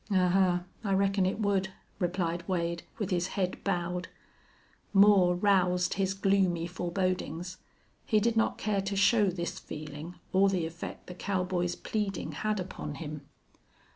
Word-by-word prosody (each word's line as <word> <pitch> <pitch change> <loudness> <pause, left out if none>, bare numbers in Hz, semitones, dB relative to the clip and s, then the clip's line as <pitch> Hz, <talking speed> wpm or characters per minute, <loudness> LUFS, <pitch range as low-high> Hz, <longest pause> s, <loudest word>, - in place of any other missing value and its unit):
"Ahuh! 185 -2 +3 0.2
I 200 -2 0
reckon 195 -1 +2
it 190 - -2
would," 200 -3 +1 0.3
replied 175 -1 -1
Wade, 170 -2 -1 0.2
with 205 -2 -3
his 175 0 +1
head 185 -2 -1
bowed. 180 -1 -1 0.9
Moore 195 -3 +6
roused 180 -2 +2
his 190 -1 0
gloomy 195 -4 +2
forebodings. 180 0 -2 0.5
He 215 - +4
did 230 +2 +1
not 225 - +2
care 205 -2 0
to 195 +1 -3
show 205 +1 +4
this 175 -1 -4
feeling 155 +3 -8 0.2
or 195 +1 +5
the 180 -4 0
effect 165 +1 -7
the 180 - -8
cowboy's 180 -2 -1
pleading 210 -3 -3
had 215 -1 -1
upon 180 -5 -5
him. 150 -1 -7
185 Hz, 140 wpm, -30 LUFS, 175-195 Hz, 0.9 s, Moore